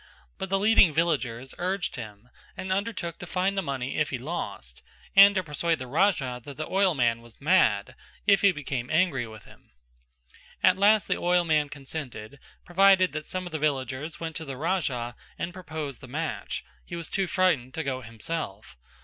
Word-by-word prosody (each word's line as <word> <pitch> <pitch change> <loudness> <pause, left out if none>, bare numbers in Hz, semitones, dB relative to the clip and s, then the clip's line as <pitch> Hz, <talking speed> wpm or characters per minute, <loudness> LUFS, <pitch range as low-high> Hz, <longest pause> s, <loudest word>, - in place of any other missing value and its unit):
But 190 - -4
the 195 - +2
leading 195 -6 +5
villagers 135 -7 0
urged 185 +1 -1
him 110 0 -9 0.3
and 185 - -4
undertook 195 -4 -2
to 175 - -7
find 190 +2 0
the 195 - +1
money 135 -5 -3
if 155 - +1
he 130 - -2
lost, 120 - -5 0.3
and 200 +1 +9
to 185 - +1
persuade 165 +1 0
the 130 - -6
Raja 135 -4 +1
that 140 +1 -9
the 155 - -3
oilman 145 -13 +2
was 115 -1 -17
mad, 140 - +3 0.3
if 200 -1 +5
he 200 - +6
became 135 -6 -4
angry 155 -7 +2
with 110 -1 -12
him. - - -19 0.9
At 185 - +6
last 210 +1 +5
the - - 0
oilman 165 -4 +2
consented, 135 -4 -7 0.3
provided 190 0 +5
that 155 0 -5
some 185 0 -4
of 175 - -7
the 155 - -3
villagers 140 +1 -2
went 160 -1 -5
to 160 - -6
the 135 -2 -6
Raja 135 -8 -1 0.2
and 175 - -4
proposed 160 -7 -6
the 130 - -10
match; 155 +5 -4 0.2
he 175 - -7
was 170 -2 -4
too 195 -1 -1
frightened 155 -8 +1
to 160 - -2
go 130 -2 -2
himself. 115 - -6
155 Hz, 180 wpm, -27 LUFS, 130-185 Hz, 0.9 s, and